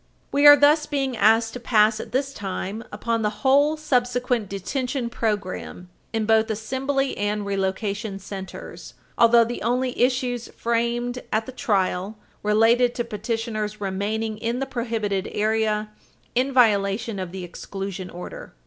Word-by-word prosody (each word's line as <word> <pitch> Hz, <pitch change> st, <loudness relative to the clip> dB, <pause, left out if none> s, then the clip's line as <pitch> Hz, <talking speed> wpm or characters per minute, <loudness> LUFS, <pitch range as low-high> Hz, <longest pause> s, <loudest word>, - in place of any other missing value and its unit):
We 285 Hz, +1 st, +5 dB
are 290 Hz, -, +12 dB
thus 295 Hz, +1 st, +4 dB
being 275 Hz, -4 st, -1 dB
asked 225 Hz, +1 st, +3 dB
to 250 Hz, -, -6 dB
pass 215 Hz, -2 st, +3 dB
at -, -, -7 dB
this 275 Hz, +2 st, -1 dB
time 200 Hz, +1 st, -4 dB
upon 230 Hz, -1 st, -1 dB
the 210 Hz, -, +1 dB, 0.2 s
whole 285 Hz, +3 st, +4 dB
subsequent 250 Hz, -6 st, 0 dB
detention 245 Hz, +5 st, -3 dB
program 200 Hz, -5 st, -3 dB, 0.2 s
in 225 Hz, -1 st, -1 dB
both 220 Hz, +1 st, +3 dB
assembly 265 Hz, +5 st, -1 dB
and 205 Hz, 0 st, -1 dB
relocation 200 Hz, +1 st, -2 dB
centers, 195 Hz, -1 st, -9 dB, 0.2 s
although 235 Hz, 0 st, +6 dB
the 235 Hz, +1 st, -4 dB
only 250 Hz, +1 st, 0 dB
issues 250 Hz, -1 st, +1 dB
framed 235 Hz, +1 st, -1 dB
at 220 Hz, +1 st, +1 dB
the 260 Hz, -, -7 dB
trial 200 Hz, -4 st, -1 dB, 0.2 s
related 225 Hz, +4 st, +3 dB
to 240 Hz, -, -1 dB
petitioner's 215 Hz, -1 st, -3 dB
remaining 210 Hz, +3 st, -2 dB
in 230 Hz, +2 st, -1 dB
the 270 Hz, -, -1 dB
prohibited 225 Hz, -6 st, -2 dB
area 215 Hz, 0 st, 0 dB, 0.4 s
in 255 Hz, +3 st, +1 dB
violation 210 Hz, -3 st, +2 dB
of 185 Hz, -2 st, -5 dB
the 190 Hz, 0 st, -6 dB
exclusion 190 Hz, +1 st, -6 dB
order. 175 Hz, -, -9 dB
225 Hz, 140 wpm, -24 LUFS, 205-250 Hz, 0.4 s, are